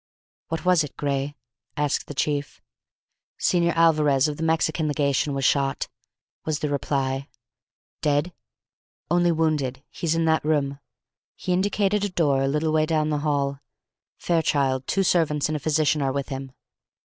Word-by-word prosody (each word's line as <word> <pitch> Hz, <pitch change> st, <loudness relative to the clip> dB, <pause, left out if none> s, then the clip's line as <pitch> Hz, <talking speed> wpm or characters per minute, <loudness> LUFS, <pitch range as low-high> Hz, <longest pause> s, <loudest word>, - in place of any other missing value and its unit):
"What 165 Hz, +2 st, -4 dB
was 180 Hz, -3 st, +4 dB
it, 145 Hz, -, -9 dB
Gray?" 140 Hz, 0 st, -2 dB, 0.4 s
asked 145 Hz, -1 st, 0 dB
the 145 Hz, -, -7 dB
chief. 145 Hz, -2 st, -2 dB, 0.8 s
"Señor 170 Hz, -1 st, +2 dB
Alvarez, 155 Hz, -4 st, +4 dB
of 150 Hz, -1 st, -4 dB
the -, -, -7 dB
Mexican 160 Hz, -1 st, +1 dB
legation, 145 Hz, -1 st, 0 dB
was 135 Hz, -1 st, -1 dB
shot," 135 Hz, 0 st, +1 dB, 0.5 s
was 155 Hz, -2 st, -1 dB
the 150 Hz, -, -2 dB
reply. 135 Hz, -1 st, -1 dB, 0.7 s
"Dead?" 150 Hz, +4 st, +1 dB, 0.8 s
"Only 175 Hz, 0 st, +3 dB
wounded. 150 Hz, -5 st, 0 dB
He's 165 Hz, -1 st, -1 dB
in 165 Hz, 0 st, +1 dB
that 160 Hz, 0 st, +2 dB
room," 150 Hz, -2 st, +1 dB
and 140 Hz, 0 st, -10 dB, 0.6 s
he 180 Hz, -, -2 dB
indicated 200 Hz, +2 st, +1 dB
a 205 Hz, -, 0 dB
door 145 Hz, -7 st, +1 dB
a 135 Hz, -, +1 dB
little 150 Hz, +3 st, 0 dB
way 155 Hz, 0 st, +2 dB
down 155 Hz, -1 st, +1 dB
the 150 Hz, -, 0 dB
hall. 140 Hz, -2 st, -1 dB, 0.6 s
"Fairchild, 140 Hz, -6 st, +1 dB
two 195 Hz, -, +1 dB
servants, 150 Hz, -5 st, +2 dB
and 155 Hz, -, -1 dB
a -, -, -1 dB
physician 155 Hz, 0 st, +1 dB
are 135 Hz, -1 st, +1 dB
with 140 Hz, +1 st, -3 dB
him." 135 Hz, -1 st, -5 dB
150 Hz, 160 wpm, -24 LUFS, 140-160 Hz, 0.8 s, was